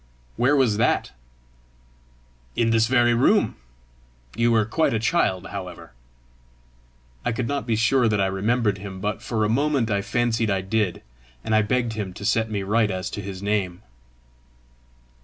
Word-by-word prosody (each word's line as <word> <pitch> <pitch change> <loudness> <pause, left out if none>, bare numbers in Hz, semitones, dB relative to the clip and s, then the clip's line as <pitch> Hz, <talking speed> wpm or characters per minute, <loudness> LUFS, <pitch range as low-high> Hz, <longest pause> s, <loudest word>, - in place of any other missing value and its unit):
"Where 130 +5 +3
was 125 -7 +2
that?" 110 - +1 1.4
"In 115 -1 +2
this 115 0 +3
very 120 -1 +3
room. 190 - +3 0.8
You 115 +1 +2
were 110 -2 +3
quite 115 +3 +1
a - - +1
child, 105 - 0
however!" 90 -3 -8 1.3
I - - 0
could 115 +1 -2
not 140 -1 -3
be 115 - +1
sure 120 +2 +3
that 105 -2 +1
I 100 - +3
remembered 100 +2 0
him, 95 -1 -8
but 105 +1 -3
for 110 -3 -1
a - - +2
moment 135 0 +1
I 100 0 +1
fancied 115 +1 0
I 95 -1 +1
did, 95 -1 -1 0.4
and 110 - -2
I 110 - +5
begged 120 +2 0
him 105 -4 -4
to 100 - -8
set 110 0 +1
me 100 -2 -2
right 105 +2 +2
as 95 0 -4
to 100 - -5
his 95 -1 -7
name. 100 -4 -1
110 Hz, 165 wpm, -23 LUFS, 100-120 Hz, 1.4 s, I